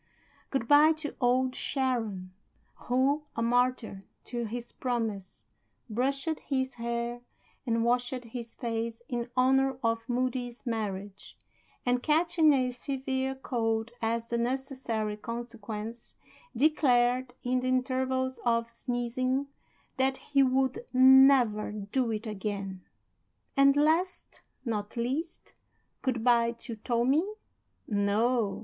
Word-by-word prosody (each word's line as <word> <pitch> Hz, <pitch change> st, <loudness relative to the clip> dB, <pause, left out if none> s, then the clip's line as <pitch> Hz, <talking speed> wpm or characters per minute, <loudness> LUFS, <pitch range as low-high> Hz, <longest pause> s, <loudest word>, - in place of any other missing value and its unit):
Good 265 Hz, -4 st, -1 dB
by 300 Hz, +3 st, +7 dB
to 310 Hz, -2 st, -6 dB
Old 255 Hz, +1 st, +2 dB
Sharon 225 Hz, -11 st, -2 dB, 0.6 s
who, 270 Hz, +4 st, +2 dB
a 230 Hz, -, -1 dB
martyr 245 Hz, -4 st, +1 dB, 0.2 s
to 240 Hz, -1 st, -4 dB
his 240 Hz, +2 st, -5 dB
promise, 225 Hz, -6 st, -3 dB, 0.5 s
brushed 275 Hz, +7 st, -1 dB
his 260 Hz, -1 st, -2 dB
hair 235 Hz, 0 st, -3 dB, 0.5 s
and 230 Hz, 0 st, +1 dB
washed 245 Hz, +1 st, 0 dB
his 235 Hz, 0 st, -8 dB
face 230 Hz, -1 st, -3 dB
in 240 Hz, -1 st, -3 dB
honor 265 Hz, +1 st, +3 dB
of 230 Hz, +1 st, 0 dB
Moody's 250 Hz, 0 st, -2 dB
marriage; 205 Hz, -4 st, -4 dB, 0.5 s
and 245 Hz, 0 st, +2 dB
catching 320 Hz, +1 st, +4 dB
a 255 Hz, -3 st, +2 dB
severe 265 Hz, +1 st, -2 dB
cold 225 Hz, -4 st, -1 dB
as 230 Hz, 0 st, 0 dB
the 235 Hz, 0 st, -2 dB
necessary 245 Hz, -4 st, -2 dB
consequence, 230 Hz, 0 st, -7 dB, 0.4 s
declared, 255 Hz, -4 st, +3 dB
in 255 Hz, +1 st, +1 dB
the 255 Hz, -, -2 dB
intervals 260 Hz, 0 st, 0 dB
of 230 Hz, -1 st, +1 dB
sneezing, 255 Hz, +3 st, -1 dB, 0.5 s
that 265 Hz, 0 st, +2 dB
he 280 Hz, -1 st, +1 dB
would 265 Hz, 0 st, +2 dB, 0.2 s
"never 260 Hz, -5 st, +6 dB
do 215 Hz, +4 st, -1 dB
it 220 Hz, +1 st, -3 dB
again." 200 Hz, -3 st, -4 dB, 0.7 s
And 275 Hz, 0 st, +6 dB
last, 325 Hz, +5 st, +1 dB, 0.2 s
not 210 Hz, -1 st, -3 dB
least, 270 Hz, +8 st, -3 dB, 0.5 s
good 240 Hz, -4 st, -1 dB
by 235 Hz, -1 st, +4 dB
to 235 Hz, 0 st, -6 dB
Tommie? 260 Hz, -, +1 dB, 0.5 s
No. 210 Hz, +2 st, +1 dB
245 Hz, 115 wpm, -29 LUFS, 230-265 Hz, 0.7 s, by